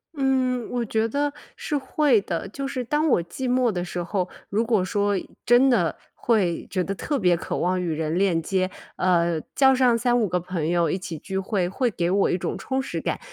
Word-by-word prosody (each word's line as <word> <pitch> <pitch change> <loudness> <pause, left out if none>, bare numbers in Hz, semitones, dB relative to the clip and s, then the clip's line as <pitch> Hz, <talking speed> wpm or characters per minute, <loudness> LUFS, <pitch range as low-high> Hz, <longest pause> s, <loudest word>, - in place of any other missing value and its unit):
嗯， 260 -3 0
我 245 -1 -1
觉 220 +1 0
得 285 +4 -1 0.2
是 300 - -2
会 265 -3 +2
的。 180 0 -4
就 275 +7 -5
是 260 -2 -3
当 295 +6 +1
我 170 - +3
寂 255 +10 -5
寞 250 -2 +3
的 175 -3 -2
时 175 0 -4
候， 180 +1 -2 0.2
如 220 +4 +1
果 220 -5 +2
说 205 +1 0 0.3
真 245 +3 +5
的 180 -10 +2 0.2
会 195 -8 +1
觉 185 -1 0
得 195 +2 -3
特 285 +7 -2
别 180 -4 +4
渴 - - -4
望 180 +1 0
与 170 -2 -2
人 160 +2 -1
链 185 -4 +2
接， 185 +2 0 0.3
呃， 170 -2 +2 0.2
叫 265 -1 +5
上 250 -2 +4
3-5 240 -2 +2
个 180 0 0
朋 170 -3 -3
友 170 -1 +2
一 185 - 0
起 175 -3 -6
聚 190 +4 -5
会， 190 -2 0
会 240 +5 0
给 175 -2 -1
我 195 +2 +2
一 180 - +1
种 - - -3
充 265 0 -2
实 270 - -4
感。 - - -2
200 Hz, 225 characters per minute, -24 LUFS, 180-250 Hz, 0.3 s, 真